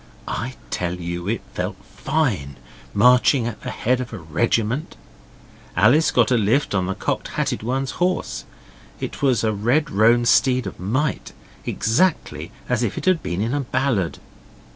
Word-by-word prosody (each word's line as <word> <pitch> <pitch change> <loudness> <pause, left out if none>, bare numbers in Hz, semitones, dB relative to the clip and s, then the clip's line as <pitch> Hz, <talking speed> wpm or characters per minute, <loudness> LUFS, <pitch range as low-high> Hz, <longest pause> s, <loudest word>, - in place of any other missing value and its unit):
I 125 +3 -3 0.2
tell 90 0 -1
you 85 0 -5
it 115 +3 -1
felt 90 +2 -3
fine, 100 - -1 0.3
marching 125 - +4
at 115 -2 -5
the - - -5
head 125 +2 0
of 125 - -6
a 110 - -6
regiment. 115 - -1 0.8
Alice 120 - +5
got 120 -1 +3
a 125 - +4
lift 110 +7 +1
on 95 -2 +1
the 95 - -2
Cocked - - -2
Hatted - - 0
One's 130 +3 -1
horse. 180 +1 0 0.6
It - - -5
was 130 -5 +2
a 110 -1 +1
red 125 +10 +1
roan 115 +3 +4
steed 125 +1 +3
of - - -7
might, 130 +11 -1 0.3
exactly 110 - 0 0.2
as 125 -2 0
if 115 -5 -1
it - - -4
had 185 -3 +3
been 90 +3 -3
in 115 +4 -1
a 145 - +1
ballad. 125 -8 0
120 Hz, 165 wpm, -22 LUFS, 100-130 Hz, 0.8 s, Alice